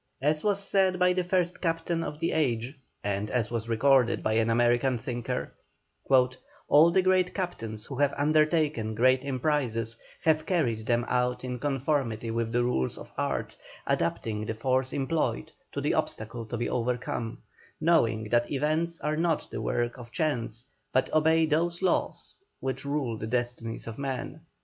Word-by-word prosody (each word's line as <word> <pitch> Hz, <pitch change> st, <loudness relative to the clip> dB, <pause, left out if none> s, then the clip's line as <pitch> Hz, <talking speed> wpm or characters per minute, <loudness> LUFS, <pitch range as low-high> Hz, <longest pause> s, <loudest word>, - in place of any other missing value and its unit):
As 150 Hz, +3 st, +1 dB
was 205 Hz, -2 st, +2 dB
said 195 Hz, -2 st, +2 dB
by 180 Hz, 0 st, +4 dB
the 180 Hz, 0 st, 0 dB
first 180 Hz, -1 st, 0 dB
captain 165 Hz, 0 st, -1 dB
of 150 Hz, -1 st, -5 dB
the 165 Hz, +2 st, -1 dB
age 125 Hz, -3 st, 0 dB, 0.3 s
and 100 Hz, +1 st, -2 dB
as 115 Hz, -2 st, 0 dB
was 115 Hz, -1 st, -3 dB
recorded 125 Hz, +1 st, +3 dB
by 110 Hz, -, +1 dB
an 115 Hz, +1 st, +2 dB
American 120 Hz, +2 st, +3 dB
thinker, 120 Hz, 0 st, -4 dB, 1.2 s
"All 155 Hz, +3 st, +7 dB
the 185 Hz, +2 st, +3 dB
great 185 Hz, -1 st, +2 dB
captains 115 Hz, -, -4 dB
who 135 Hz, -, -7 dB
have 140 Hz, 0 st, +3 dB
undertaken 150 Hz, -6 st, +2 dB
great 130 Hz, +3 st, +4 dB
emprises 130 Hz, -5 st, -1 dB, 0.3 s
have 155 Hz, -1 st, +2 dB
carried 120 Hz, -, 0 dB
them 120 Hz, 0 st, +2 dB
out 125 Hz, 0 st, 0 dB
in 125 Hz, -1 st, -4 dB
conformity 135 Hz, -5 st, -1 dB
with 115 Hz, 0 st, -1 dB
the 120 Hz, +1 st, +2 dB
rules 65 Hz, -, 0 dB
of -, -, -11 dB
art, -, -, -2 dB, 0.3 s
adapting 105 Hz, +5 st, -1 dB
the 110 Hz, -, -2 dB
force 130 Hz, +3 st, +1 dB
employed 140 Hz, -, -1 dB, 0.2 s
to -, -, -3 dB
the -, -, 0 dB
obstacle 115 Hz, +1 st, -2 dB
to 120 Hz, -, -4 dB
be 120 Hz, -, -1 dB
overcome, 120 Hz, -1 st, -2 dB, 0.4 s
knowing 120 Hz, -10 st, +3 dB
that 120 Hz, +1 st, +2 dB
events 155 Hz, +4 st, 0 dB
are 150 Hz, 0 st, 0 dB
not 165 Hz, -1 st, 0 dB
the -, -, -4 dB
work 120 Hz, +1 st, -1 dB
of 120 Hz, -1 st, -10 dB
chance, 125 Hz, -8 st, -1 dB, 0.3 s
but 130 Hz, -, +1 dB
obey 160 Hz, +1 st, +4 dB
those 170 Hz, +3 st, 0 dB
laws 185 Hz, -, 0 dB, 0.3 s
which 135 Hz, +1 st, -3 dB
rule 140 Hz, -6 st, -2 dB
the 110 Hz, -, -4 dB
destinies 120 Hz, -1 st, -2 dB
of 115 Hz, +1 st, -7 dB
men." 135 Hz, -2 st, -4 dB
130 Hz, 165 wpm, -28 LUFS, 115-155 Hz, 1.2 s, All